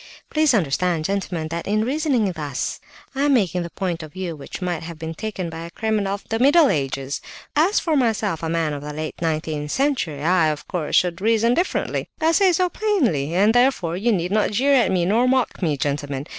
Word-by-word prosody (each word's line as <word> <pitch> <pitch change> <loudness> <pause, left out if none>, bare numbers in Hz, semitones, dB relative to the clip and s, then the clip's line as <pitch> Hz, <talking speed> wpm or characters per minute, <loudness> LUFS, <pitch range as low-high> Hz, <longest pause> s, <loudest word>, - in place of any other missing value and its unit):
Please 305 -4 +3
understand, 170 -1 0
gentlemen, 180 -5 -2
that 170 +1 -4
in 215 +2 +1
reasoning 265 - +1
thus, 150 -6 -4 0.3
I 270 - -2
am 285 -2 +4
taking 180 -6 +1
the 170 - -5
point 175 -2 -3
of 155 -2 -10
view 180 -3 -4
which 140 - -8
might 180 -3 -2
have 165 0 -8
been 160 0 -5
taken 195 0 -4
by 165 0 -7
a 165 +1 -7
criminal 210 0 -1
of 200 - -13
the 225 - -2
middle 285 +3 +5
ages. 135 -1 -2 0.3
As 340 +8 +3
for 320 -3 0
myself, 220 - 0
a 165 - -2
man 165 -2 0
of 145 - -5
the 150 +1 -6
late 155 +2 -6
nineteenth 155 -2 -2
century, 235 - -1
I, 170 -1 +3
of 150 -1 -3
course, 175 -6 -2
should 180 -1 +2
reason 225 +2 +3
differently; 350 +7 -1
I 320 0 +3
say 375 +3 +4
so 360 +2 +2
plainly, 250 - 0
and 205 +4 +4
therefore 245 -9 +2
you 220 +6 +1
need 180 -3 -1
not 215 0 +2
jeer 265 +7 +2
at 255 -4 +4
me 180 -2 +1
nor 225 +7 +3
mock 260 -4 0
me, 155 -5 0
gentlemen. 145 -1 -2
185 Hz, 210 wpm, -22 LUFS, 160-240 Hz, 0.3 s, middle